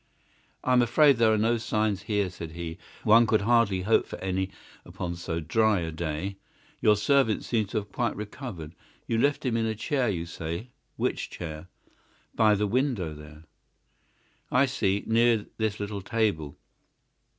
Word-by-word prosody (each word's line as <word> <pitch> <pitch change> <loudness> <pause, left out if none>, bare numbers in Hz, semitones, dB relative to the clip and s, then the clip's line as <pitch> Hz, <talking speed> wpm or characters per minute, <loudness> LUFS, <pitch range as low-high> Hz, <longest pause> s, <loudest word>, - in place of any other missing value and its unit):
"I 130 - +2
am 125 - +6
afraid 135 +3 +5
there 115 -1 +4
are 110 - +3
no 115 +3 +2
signs 110 -3 0
here," 100 -4 -1
said 85 -3 -8
he. 85 0 -6 0.2
"One 115 +1 +6
could 110 0 +3
hardly 105 -4 +2
hope 110 +4 +3
for - - -7
any 95 0 -2 0.3
upon 85 -1 -5
so 85 -1 -3
dry 105 +4 +2
a 80 -1 -3
day. 80 +4 -4 0.4
Your 105 - +5
servant 110 +1 +2
seems 110 -4 -1
to - - -2
have 105 -1 -4
quite - - -1
recovered. 105 - -7 0.3
You 115 - 0
left 145 +3 +1
him 120 -3 +1
in 115 -1 +1
a 110 - -2
chair, 125 +2 0
you 85 -4 -2
say; 85 +7 -6 0.2
which - - -2
chair?" 80 0 -7 0.7
"By 110 -2 +4
the 105 +1 0
window 110 - 0
there." 75 +1 -12 1.1
"I 130 +2 +4
see. 100 -7 0
Near 115 -1 +3
this 110 -1 -1
little 100 -1 -4
table. 95 -9 -1
105 Hz, 165 wpm, -27 LUFS, 90-115 Hz, 1.1 s, am